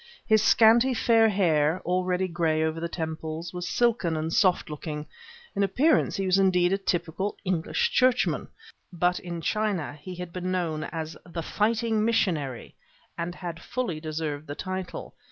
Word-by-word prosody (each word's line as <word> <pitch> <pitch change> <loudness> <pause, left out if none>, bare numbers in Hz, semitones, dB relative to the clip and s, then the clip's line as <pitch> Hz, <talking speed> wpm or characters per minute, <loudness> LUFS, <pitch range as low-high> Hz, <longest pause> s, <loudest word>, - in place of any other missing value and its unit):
His 220 -1 +4
scanty 235 +4 +5
fair 225 -1 +4
hair, 165 -4 +2
already 180 +1 0
gray 165 -2 0
over 160 0 -1
the 170 +1 -3
temples, 160 0 -5
was 180 0 -4
silken 220 -9 +1
and 160 +1 -2
soft 185 -3 +3
looking; 150 0 -5 0.5
in 200 - 0
appearance 265 - +2
he 195 - -1
was 185 +1 +3
indeed 180 -1 +3
a - - +2
typical 180 +1 -2
English 185 - 0
churchman; 255 - +2 0.4
but 180 0 +1
in 170 -2 -6
China 205 -5 -1
he 185 +4 -7
had 180 -1 -7
been 185 0 -3
known 165 -4 -1
as 160 -1 -5
"the 170 -1 -6
fighting 220 +3 +1
missionary," 165 - 0 0.4
and 170 +1 -4
had 170 -2 -6
fully 235 -11 -3
deserved 155 -1 -4
the 145 - -5
title. 185 0 -5
180 Hz, 155 wpm, -27 LUFS, 160-200 Hz, 0.5 s, scanty